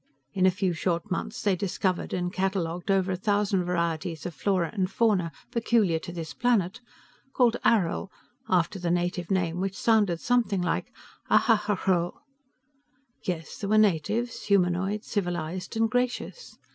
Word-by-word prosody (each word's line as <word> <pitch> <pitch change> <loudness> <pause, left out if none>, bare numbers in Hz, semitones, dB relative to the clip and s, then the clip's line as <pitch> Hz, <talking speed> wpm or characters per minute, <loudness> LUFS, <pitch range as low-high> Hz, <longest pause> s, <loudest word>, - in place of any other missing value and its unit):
In 185 -1 +3
a - - +7
few 185 -1 0
short 170 +1 -2
months 210 +4 -3
they 200 -3 +3
discovered 185 0 -1
and 180 0 -2
cataloged 185 -2 -2
over 190 -1 +2
a - - 0
thousand 200 -1 +1
varieties 170 -2 -2
of 175 - -4
flora 180 +1 0
and 190 -3 0
fauna 195 -7 +1 0.2
peculiar 225 -8 +2
to 175 - -8
this 165 -2 -6
planet, 230 -2 +1 0.5
called 240 -2 +3
Arrill, 195 -3 +2 0.4
after 180 +2 +1
the 175 -1 -2
native 175 0 -1
name 180 -3 0
which 195 0 -2
sounded 210 -7 +2
something 230 -6 +1
like 175 - -1 0.4
Ahhrhell. 195 -6 +2 1.1
Yes, 165 -4 -4
there 200 - -3
were 215 - +4
natives, 215 +4 +1
humanoid, 195 +1 +1
civilized 180 0 -3
and 225 0 +3
gracious. 250 - -2
185 Hz, 145 wpm, -27 LUFS, 175-210 Hz, 1.1 s, a